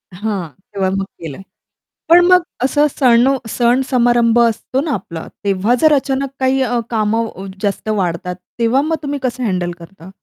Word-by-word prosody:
हां, 200 -3 -3 0.3
तेव्हा 190 -1 0
मग 195 0 -1
केलं. 165 -3 -10 0.7
पण 350 +1 +7
मग 365 -1 +5 0.2
असं 290 +3 +3
सण 245 -2 +3 0.2
सण-समारंभ 240 -1 +2
असतो 235 +3 +1
ना 305 -1 -2
आपला. 170 -6 -6 0.2
तेव्हा 200 +4 +1
जर 310 -1 +5
अचानक 275 -1 0
काही 265 0 +2
अ, 245 -1 0
कामं 220 -3 -1
जास्त 205 +1 -2
वाढतात, 180 -3 -1 0.2
तेव्हा 235 +4 +3
मग 320 +2 0
तुम्ही 285 0 -3
कसं 255 0 -2
हँडल 180 -5 -1
करता? 170 +1 -13
235 Hz, 155 wpm, -17 LUFS, 195-265 Hz, 0.7 s, पण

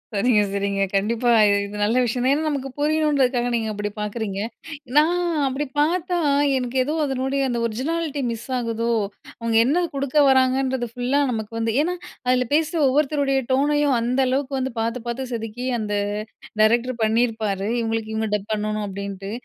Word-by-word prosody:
சரிங்க, 210 +1 +3
சரிங்க. 200 0 -1
கண்டிப்பா. 230 +5 +1 0.4
இது 205 +1 -7
நல்ல 220 +4 +2
விஷயம் 245 +1 -1
தான். 270 - +4
ஏன்னா, 310 +2 0
நமக்கு 270 -2 -3
புரியணுன்றதுக்காக 285 -5 +2
நீங்க 225 -1 -1
அப்டி 205 0 -3
பார்க்குறீங்க. 210 -2 -3 0.6
நான் 345 +4 +4 0.3
அப்டி 270 +3 -2
பார்த்தா, 350 +3 +1 0.4
எனக்கு 250 +1 -3
ஏதோ 300 +4 -2
அதனுடைய 270 +1 -1
அந்த 240 -1 -1
ஒரிஜினாலிட்டி 290 +5 -2
மிஸ் 230 -1 -6
ஆகுதோ, 230 -1 -2 0.5
அவங்க 230 -1 -1
என்ன 320 +7 +2
குடுக்க 280 +1 -2
வராங்கன்றது 260 -1 +2
ஃபுல்லா 255 +4 +1
நமக்கு 220 -1 -4
வந்து. 225 -1 0
ஏன்னா, 360 +2 -1 0.3
அதில 250 -1 +2
பேசுற 320 +2 +1
ஒவ்வொருத்தருடைய 275 -1 +2
டோனையும் 290 0 +2
அந்த 250 +3 +1
அளவுக்கு 270 +1 -1
வந்து 260 -2 -3
பார்த்து 230 +2 -2
பார்த்து 255 +2 -3
செதுக்கி 225 +2 -5
அந்த 210 -1 -2 0.7
டைரக்டர் 240 +3 +3
பண்ணியிருப்பாரு. 220 -3 0
இவங்களுக்கு 225 -1 -2
இவங்க 220 -1 -1
டப் 205 +1 -5
பண்ணணும் 215 0 -2
அப்படின்ட்டு. 195 0 -6
245 Hz, 150 wpm, -22 LUFS, 220-275 Hz, 0.7 s, தான்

